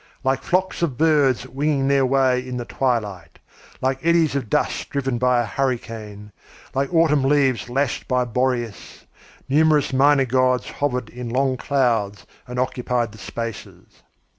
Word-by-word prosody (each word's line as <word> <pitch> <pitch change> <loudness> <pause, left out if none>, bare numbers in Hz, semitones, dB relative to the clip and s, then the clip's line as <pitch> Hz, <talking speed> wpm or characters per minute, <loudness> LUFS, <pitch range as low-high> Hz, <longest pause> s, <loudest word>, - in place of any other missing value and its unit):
Like 135 0 +1
flocks 185 0 -1
of 150 -8 -1
birds 145 -5 +2
winging 140 0 0
their 140 -1 +3
way 130 -1 +2
in 125 0 -6
the 120 - -4
twilight, 105 - -2 0.4
like 130 0 -1
eddies 165 -3 +3
of 130 -6 -3
dust - - -1
driven 135 -3 -2
by 125 0 +3
a 120 - 0
hurricane, 110 -4 -4 0.4
like 135 +3 -1
autumn 160 -4 +3
leaves 135 -4 +1
lashed 135 +1 -1
by 125 -1 +1
Boreas, 120 -2 -3 0.4
numerous 150 0 +3
minor 135 +1 +4
gods 130 0 +1
hovered 125 -5 -2
in 125 -1 -7
long 130 +2 +1
clouds 115 -7 0 0.2
and 125 0 -7
occupied 125 -2 -1
the 110 - -14
spaces. 115 -2 -8
130 Hz, 145 wpm, -22 LUFS, 120-140 Hz, 0.4 s, minor